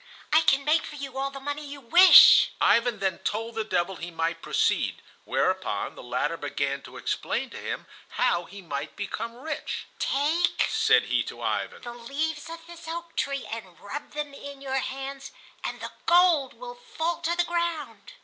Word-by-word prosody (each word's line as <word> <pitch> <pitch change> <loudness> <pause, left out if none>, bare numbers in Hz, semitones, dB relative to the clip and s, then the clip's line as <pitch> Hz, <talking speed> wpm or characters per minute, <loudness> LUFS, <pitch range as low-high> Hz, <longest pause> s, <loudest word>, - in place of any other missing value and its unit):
"I 315 - +7
can 275 -3 +3
make 310 +2 +4
for 300 - -8
you 275 -2 -7
all 275 0 -1
the 275 0 -9
money 290 +2 -4
you 285 0 -8
wish." 345 +9 +8
Ivan 235 -1 +3
then 190 -3 -1
told 225 +2 -3
the 220 -1 -1
devil 185 -3 -1
he 170 - -6
might 165 0 -2
proceed, - - +1 0.3
whereupon - - -1
the - - -11
latter 125 +7 -2
began 140 -1 -2
to - - -12
explain - - -2
to - - -8
him - - -5 0.3
how 175 0 +2
he 200 +2 -11
might 150 -2 -5
become 225 +3 -5
rich. 300 +4 -5
"Take," 305 +6 +1
said - - +4
he - - +1
to - - -8
Ivan, - - -2
"the 240 -1 -6
leaves 290 +6 -3
of 330 0 -9
this 340 -1 -12
oak 335 0 -6
tree 275 -1 -1
and 190 -7 -7
rub 275 +9 -7
them 295 -1 -4
in 280 0 -9
your 270 -1 -1
hands, 270 +1 -6 0.3
and - - -4
the - - -6 0.2
gold 340 -6 +4
will - - -8
fall 430 -9 -3
to 335 +1 0
the 350 - +4
ground." 340 +6 -3
275 Hz, 185 wpm, -26 LUFS, 215-320 Hz, 0.3 s, wish